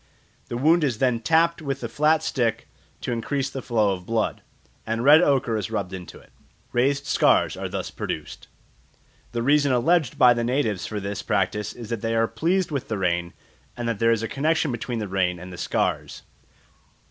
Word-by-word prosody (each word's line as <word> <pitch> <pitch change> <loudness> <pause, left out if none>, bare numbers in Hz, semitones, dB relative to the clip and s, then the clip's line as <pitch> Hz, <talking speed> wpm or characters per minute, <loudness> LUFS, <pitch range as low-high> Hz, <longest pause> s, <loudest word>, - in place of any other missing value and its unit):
The 120 - -4
wound 160 +6 +4
is 130 -6 0
then 125 -2 +1
tapped 165 +7 +2
with 135 -3 -4
a - - -1
flat 150 +6 +2
stick 115 -6 -1 0.3
to - - -3
increase 135 +4 -2
the 135 - -5
flow 110 -5 +1
of 90 -1 -8
blood, 115 -1 -1 0.4
and 115 +1 -2
red 150 +4 +8
ochre 130 -8 +2
is 100 -4 -3
rubbed 100 -2 -3
into 90 -2 -8
it. - - -19 0.4
Raised 135 +3 +1
scars - - +3
are - - -5
thus - - -4
produced. - - -6 0.8
The 120 -1 -2
reason 145 +1 +3
alleged 135 +2 +2
by 125 -1 +7
the 120 0 -2
natives 115 -6 -1
for 105 - -4
this 100 0 -4
practice 105 0 -1
is 115 -3 -9
that 115 -3 -2
they 115 0 -1
are 115 0 +2
pleased 170 +10 0
with 140 -4 -3
the 110 - -2
rain, 85 -2 -1 0.4
and 120 -1 -3
that 115 -3 -2
there 115 0 +4
is 115 -1 +1
a - - -1
connexion 155 +3 0
between 120 0 -4
the 105 -2 -3
rain 95 -2 0
and 90 +1 -9
the - - -9
scars. - - -2
120 Hz, 195 wpm, -24 LUFS, 110-140 Hz, 0.8 s, red